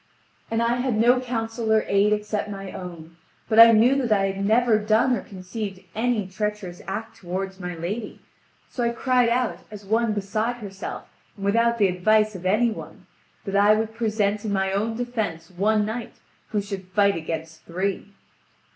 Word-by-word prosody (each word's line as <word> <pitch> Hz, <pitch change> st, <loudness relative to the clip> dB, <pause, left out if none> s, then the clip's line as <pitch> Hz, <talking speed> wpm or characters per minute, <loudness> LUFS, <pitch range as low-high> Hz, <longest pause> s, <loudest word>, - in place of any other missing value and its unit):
And 225 Hz, +1 st, 0 dB
I 235 Hz, +1 st, +1 dB
had 245 Hz, -3 st, 0 dB
no 240 Hz, +3 st, +5 dB
counsel 225 Hz, -2 st, -3 dB
or 220 Hz, 0 st, +4 dB
aid 200 Hz, +1 st, +3 dB
except 210 Hz, 0 st, -1 dB
my 195 Hz, -2 st, -6 dB
own; 170 Hz, -2 st, -9 dB, 0.3 s
but 220 Hz, -, +3 dB
I 230 Hz, 0 st, +11 dB
knew 230 Hz, +4 st, +5 dB
that 250 Hz, -5 st, -1 dB
I 195 Hz, -2 st, +3 dB
had 195 Hz, +1 st, -4 dB
never 225 Hz, +1 st, +3 dB
done 220 Hz, +4 st, +3 dB
or 205 Hz, -, -4 dB
conceived 195 Hz, +1 st, -6 dB
any 225 Hz, -2 st, 0 dB
treacherous 190 Hz, -1 st, -4 dB
act 225 Hz, +4 st, -5 dB
toward 190 Hz, +2 st, -5 dB
my 180 Hz, -1 st, -5 dB
lady, 200 Hz, +7 st, -5 dB, 0.5 s
so 245 Hz, -, -4 dB
I 235 Hz, -, +2 dB
cried 250 Hz, 0 st, +2 dB
out, 245 Hz, 0 st, 0 dB
as 210 Hz, -1 st, -10 dB
one 225 Hz, +2 st, +1 dB
beside 215 Hz, +4 st, -1 dB
herself, 200 Hz, -4 st, -7 dB, 0.3 s
and 195 Hz, -, -6 dB
without 230 Hz, +3 st, +2 dB
the 205 Hz, -3 st, +4 dB
advice 215 Hz, +4 st, +2 dB
of 185 Hz, -1 st, -5 dB
any 220 Hz, +5 st, +3 dB
one, 220 Hz, -, -9 dB, 0.4 s
that 195 Hz, -1 st, -3 dB
I 205 Hz, +1 st, +6 dB
would 220 Hz, 0 st, -2 dB
present 215 Hz, -2 st, 0 dB
in 215 Hz, -, -2 dB
my 190 Hz, -1 st, 0 dB
own 220 Hz, +3 st, -1 dB
defence 220 Hz, -10 st, -3 dB
one 210 Hz, +4 st, +1 dB
knight 225 Hz, +2 st, -5 dB, 0.3 s
who 210 Hz, -2 st, -1 dB
should 195 Hz, -2 st, -7 dB
fight 200 Hz, +1 st, +3 dB
against 160 Hz, 0 st, -5 dB
three. 190 Hz, +4 st, -2 dB
210 Hz, 180 wpm, -24 LUFS, 195-230 Hz, 0.5 s, I